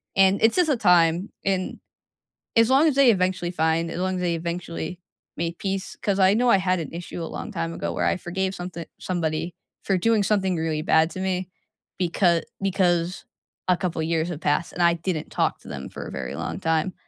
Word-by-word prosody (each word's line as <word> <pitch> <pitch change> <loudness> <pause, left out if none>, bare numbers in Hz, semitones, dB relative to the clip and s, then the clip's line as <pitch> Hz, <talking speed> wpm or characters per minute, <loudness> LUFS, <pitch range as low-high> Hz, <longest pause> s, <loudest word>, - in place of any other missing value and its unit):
and 195 0 +4
it's 225 - +5
just 355 -3 +3
a 290 - +3
time 180 -2 +4 0.2
and 190 -1 -1 0.8
as 230 +1 +5
long 275 +5 +5
as 295 - +2
they 275 -3 +6
eventually 185 -3 0
find 165 -1 +1
as - - -4
long 185 +1 0
as 180 - -3
they 175 -2 +1
eventually 170 0 -4 0.4
made 170 0 -2
peace 195 -1 -3
'cause 200 -2 0
I 190 +1 +6
know 245 +3 +3
I 195 - +6
had 185 -1 +1
an 160 - -5
issue 170 0 -6
a - - -3
long - - -6
time 165 -2 -2
ago, - - -3
where - - 0
I - - +2
forgave 190 +2 -2
something 175 -2 -6
somebody 165 -1 -2 0.3
for 195 - +1
doing 220 +2 +2
something 190 -3 +1
really 160 -1 -1
bad 160 0 +3
to - - -7
me, 185 -1 -1 0.5
becau 170 -1 +2 0.2
because 180 -2 +1 0.4
a 180 - +5
couple 175 -3 -2
years 165 +1 0
have 165 -3 -5
passed 145 +3 0
and 180 - -3
I 170 0 +5
didn't 165 -2 -3
talk - - 0
to - - -15
them 65 -2 -6
for - - -7
a - - -8
very - - -5
long - - -4
time. 165 +3 0
180 Hz, 210 wpm, -24 LUFS, 165-190 Hz, 0.8 s, they